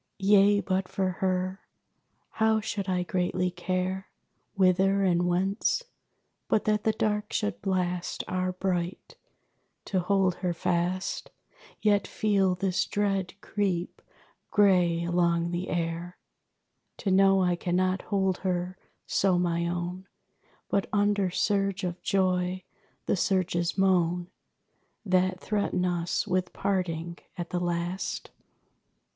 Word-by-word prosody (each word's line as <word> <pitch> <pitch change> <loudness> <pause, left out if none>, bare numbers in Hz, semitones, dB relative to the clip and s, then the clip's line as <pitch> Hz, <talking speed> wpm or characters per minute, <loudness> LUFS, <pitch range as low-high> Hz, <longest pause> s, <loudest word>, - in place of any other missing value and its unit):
Yea, 200 +1 +5
but 185 0 -1
for 190 0 -1
her, 185 0 0 0.8
how 220 0 +4
should 200 -2 -3
I 180 -1 +1
greatly 180 0 0
care 185 +2 -2 0.5
Whither 195 +1 +3
and 175 -1 +2
whence? 195 - +1 0.6
But 210 - +1
that 210 -1 +1
the 220 - +4
dark 210 -1 -1
should 100 -1 -2
blast 180 -2 -1
Our 185 0 -1
bright! 180 -1 -3 0.7
To 190 - 0
hold 185 0 +2
her 180 -2 -2
fast, 180 +2 -1 0.5
Yet 205 -3 +3
feel 195 -3 +1
this 185 0 0
dread 195 -3 -1
creep 190 -4 -2 0.5
gray 180 -4 +3
along 170 0 +1
the 175 +2 -3
air. 170 +1 -3 0.8
To 195 - -1
know 195 0 +5
I 180 -1 +2
cannot 185 +1 0
hold 190 -2 0
her 180 0 -2 0.3
so 190 -2 +2
my 170 -1 0
own, 175 +2 -4 0.6
But 195 - 0
under 205 -2 +2
surge 195 +1 0
of 180 -1 -3
joy, 185 -1 0 0.4
the - - +1
surges 180 -2 0
moan 180 -2 +2 0.7
That 185 -1 +2
threaten 200 -4 -1
us 175 -1 0
with 185 0 -1
parting 175 -3 -2 0.2
at 175 -1 -5
the 180 - 0
last! 175 +1 -3
185 Hz, 120 wpm, -28 LUFS, 175-195 Hz, 0.8 s, Yea